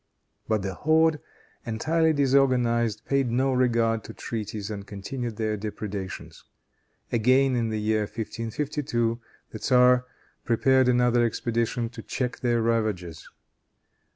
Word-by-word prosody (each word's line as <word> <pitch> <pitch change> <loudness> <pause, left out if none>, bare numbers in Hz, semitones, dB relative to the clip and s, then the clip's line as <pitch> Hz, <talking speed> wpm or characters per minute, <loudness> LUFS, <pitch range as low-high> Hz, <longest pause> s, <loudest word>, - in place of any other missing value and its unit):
But 110 -3 0
the 95 -1 -3
horde, 160 - +2 0.4
entirely 160 +8 +1
disorganized, 125 -6 +2
paid 135 -2 +1
no 130 +3 +1
regard 115 -3 +1
to - - -9
treaties 105 -2 -5
and 100 -2 -5
continued 115 +3 -5
their 110 -1 -1
depredations. 100 -2 -6 0.7
Again, 130 +3 +3
in 115 -2 0
the 110 -1 -2
year 110 +1 +1
1552, 115 +1 -3 0.3
the 110 - -7
tzar 125 0 +4 0.4
prepared 130 +2 +3
another 120 -1 +3
expedition 115 0 -1
to 115 -1 -9
check 125 +2 -3
their 120 -2 +1
ravages. 105 -8 -2
115 Hz, 120 wpm, -26 LUFS, 110-130 Hz, 0.7 s, tzar